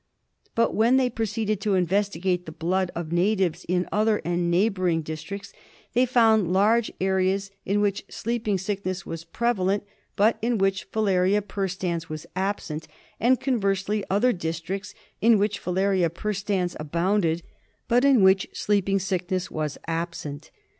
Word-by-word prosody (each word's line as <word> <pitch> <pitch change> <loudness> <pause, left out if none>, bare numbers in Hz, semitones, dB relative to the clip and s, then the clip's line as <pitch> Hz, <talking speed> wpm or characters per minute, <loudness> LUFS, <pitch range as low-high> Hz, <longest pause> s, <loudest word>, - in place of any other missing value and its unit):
But 230 - +2
when 235 +4 +4
they 255 -2 +2
proceeded 215 -2 -2
to 200 -1 +1
investigate 185 -1 0
the - - -5
blood 180 +4 -1
of 165 -1 -4
natives 185 -1 +1
in 180 0 +1
other 215 +1 +2
and 175 0 0
neighbouring 180 -3 +1
districts, 190 +6 -7 0.4
they 250 +2 +3
found 220 -7 +4
large 215 +5 +3
areas 190 +1 +1 0.2
in 205 +2 +2
which 200 -1 0
Sleeping 225 -3 -1
Sickness 185 -1 -3
was 165 0 -6
prevalent 200 0 0 0.3
but 215 +3 +3
in 235 +1 +1
which 195 +1 0
Filaria 200 -1 +2
perstans 185 -4 -3
was 155 -1 -6
absent, 185 -5 -3 0.3
and, 250 +2 +3
con 255 -5 0
versely, 195 +1 0
other 235 +6 +3
districts 175 +4 -4 0.3
in 230 0 +6
which 210 +1 0
Filaria 185 -1 +1
perstans 195 -1 -2
abounded 170 +2 0 0.4
but 245 +2 +3
in 270 -7 +5
which 190 0 +5
Sleeping 195 -1 +1
Sickness 185 -1 -2
was 155 -2 -3
absent. 165 -3 -4
195 Hz, 140 wpm, -25 LUFS, 175-210 Hz, 0.4 s, in